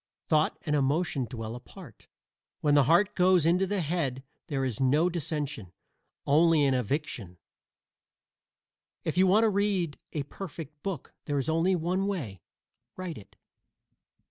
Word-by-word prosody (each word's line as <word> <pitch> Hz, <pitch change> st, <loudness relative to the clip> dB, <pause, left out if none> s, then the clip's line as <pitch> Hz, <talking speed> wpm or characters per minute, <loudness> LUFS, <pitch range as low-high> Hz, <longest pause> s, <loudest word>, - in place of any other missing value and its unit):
Thought 155 Hz, -1 st, +2 dB
and 150 Hz, -, +1 dB
emotion 145 Hz, 0 st, +1 dB
dwell 115 Hz, -1 st, -5 dB
apart. 120 Hz, -, -13 dB, 0.5 s
When 145 Hz, -1 st, +3 dB
the 145 Hz, -2 st, +5 dB
heart 190 Hz, +7 st, +4 dB
goes 180 Hz, -3 st, +4 dB
into 180 Hz, +3 st, +3 dB
the 200 Hz, -1 st, 0 dB
head 145 Hz, -5 st, -2 dB, 0.2 s
there 135 Hz, -5 st, -1 dB
is 120 Hz, -5 st, -3 dB
no 150 Hz, +7 st, +3 dB
dissension; 145 Hz, -, -4 dB, 0.5 s
only 155 Hz, +1 st, +4 dB
an 135 Hz, -, +3 dB
eviction. 125 Hz, -, -3 dB, 1.7 s
If -, -, -2 dB
you 185 Hz, +1 st, +5 dB
want 210 Hz, +5 st, +5 dB
to 225 Hz, -, +4 dB
read 195 Hz, -6 st, 0 dB
a 150 Hz, -, -1 dB
perfect 155 Hz, -2 st, -9 dB
book 190 Hz, -8 st, -5 dB
there 145 Hz, -1 st, -1 dB
is 135 Hz, +2 st, -1 dB
only 165 Hz, +4 st, +2 dB
one 180 Hz, +3 st, 0 dB
way: 125 Hz, -, -4 dB, 0.6 s
write 185 Hz, -6 st, -5 dB
it. 100 Hz, -, -18 dB
155 Hz, 145 wpm, -28 LUFS, 135-180 Hz, 1.7 s, the